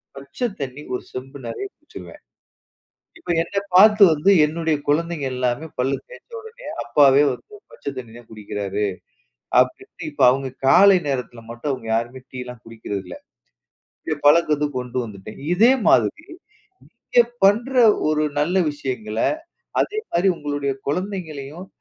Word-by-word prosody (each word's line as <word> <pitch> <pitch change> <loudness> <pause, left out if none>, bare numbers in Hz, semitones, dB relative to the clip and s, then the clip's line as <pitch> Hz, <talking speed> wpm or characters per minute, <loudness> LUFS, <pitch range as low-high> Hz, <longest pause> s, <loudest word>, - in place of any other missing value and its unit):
பச்ச 140 - -4
தண்ணி 135 0 -5
1 125 - -3
செம்பு 135 +2 -8
நெறைய 115 +12 -5
குடிச்சுருவேன். 305 - -13 1.0
இப்ப 345 - -9
என்னப் 200 +3 -4
பார்த்து 210 +2 +7
வந்து 155 +6 +2 0.2
என்னுடைய 160 0 -1
குழந்தைங்க 160 0 0
எல்லாமே 125 +4 -1
பல்லு 135 +2 +1
தேய்ச்ச - - -15
உடனே, 450 +3 -13 0.2
"அப்பாவே 135 +3 +5
வந்து 125 - -11 0.2
பச்ச - - -18
தண்ணி 120 -3 -9
தான் 120 -1 -17
குடிக்கிறாரு." 105 -1 -3 0.7
அப்படீன்ட்டு 130 +6 -3
இப்ப 140 -2 +2
அவங்க 135 +1 -1 0.2
காலை 195 +4 +7
நேரத்தில 125 -3 -4
மட்டும் 120 +5 -3
அவங்க 125 -4 -6
யாருமே 120 +3 -4
டீ 130 - -9
எல்லாம் 125 -2 -10
குடிக்கிறதில்ல. 100 -5 -6 1.0
என் 145 - -5
பழக்கத்த 150 -1 +4
கொண்டு 125 0 -4
வந்துட்டேன். 105 -1 -10 0.2
இதே 230 +8 +6 0.2
மாதிரி, 310 - +2 0.7
நீங்க 240 - +1 0.2
பண்ற 225 +7 +3 0.4
ஒரு 155 0 +1 0.2
நல்ல 175 +6 0 0.2
விஷயங்கள, 120 -7 -5 0.6
அதே 430 - -1
மாரி 175 +3 +2
உங்களுடைய 145 -2 -2 0.2
குழந்தைங்களையும், 165 -2 -4
145 Hz, 130 wpm, -21 LUFS, 125-180 Hz, 1.0 s, பார்த்து